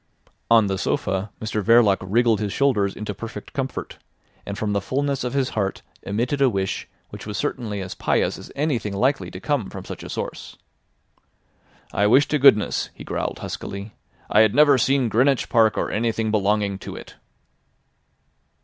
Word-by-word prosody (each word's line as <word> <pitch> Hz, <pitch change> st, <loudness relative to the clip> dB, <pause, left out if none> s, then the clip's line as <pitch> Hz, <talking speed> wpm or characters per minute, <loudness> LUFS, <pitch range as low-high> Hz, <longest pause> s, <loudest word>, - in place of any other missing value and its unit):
On 115 Hz, -2 st, +6 dB
the 95 Hz, -1 st, -2 dB
sofa 95 Hz, +2 st, -1 dB
Mr 110 Hz, -1 st, -2 dB
Verloc 115 Hz, -3 st, +5 dB
wriggled 110 Hz, +3 st, +2 dB
his 105 Hz, -2 st, -2 dB
shoulders 105 Hz, -8 st, +1 dB
into 105 Hz, -1 st, -5 dB
perfect 115 Hz, +4 st, -8 dB
comfort, 135 Hz, -3 st, -4 dB, 0.5 s
and 100 Hz, 0 st, -4 dB
from 105 Hz, -1 st, -1 dB
the 100 Hz, -, 0 dB
fulness 140 Hz, +4 st, -1 dB
of 125 Hz, +2 st, -3 dB
his 135 Hz, -2 st, +1 dB
heart 100 Hz, -3 st, -2 dB, 0.2 s
emitted 120 Hz, +8 st, -2 dB
a 135 Hz, -, +5 dB
wish 95 Hz, -3 st, -2 dB, 0.2 s
which -, -, -9 dB
was 105 Hz, -1 st, -4 dB
certainly 115 Hz, -8 st, -3 dB
as 90 Hz, -1 st, -5 dB
pious -, -, 0 dB
as -, -, -11 dB
anything 130 Hz, -9 st, -1 dB
likely 130 Hz, +8 st, 0 dB
to -, -, -8 dB
come 140 Hz, -9 st, -1 dB
from -, -, -8 dB
such -, -, -7 dB
a -, -, -8 dB
source. -, -, -6 dB, 1.4 s
"I 100 Hz, +1 st, +2 dB
wish 130 Hz, +6 st, +5 dB
to 150 Hz, -, +1 dB
goodness," 130 Hz, -7 st, +4 dB
he -, -, -10 dB
growled -, -, -3 dB
huskily, 100 Hz, +2 st, -6 dB, 0.3 s
"I 105 Hz, -, +3 dB
had 110 Hz, 0 st, +4 dB
never 145 Hz, -2 st, +6 dB
seen 135 Hz, 0 st, +2 dB
Greenwich 125 Hz, +4 st, +2 dB
Park 115 Hz, -3 st, +3 dB
or -, -, -1 dB
anything 110 Hz, 0 st, 0 dB
belonging 100 Hz, -1 st, +1 dB
to -, -, -8 dB
it." -, -, -11 dB
110 Hz, 170 wpm, -23 LUFS, 100-130 Hz, 1.4 s, On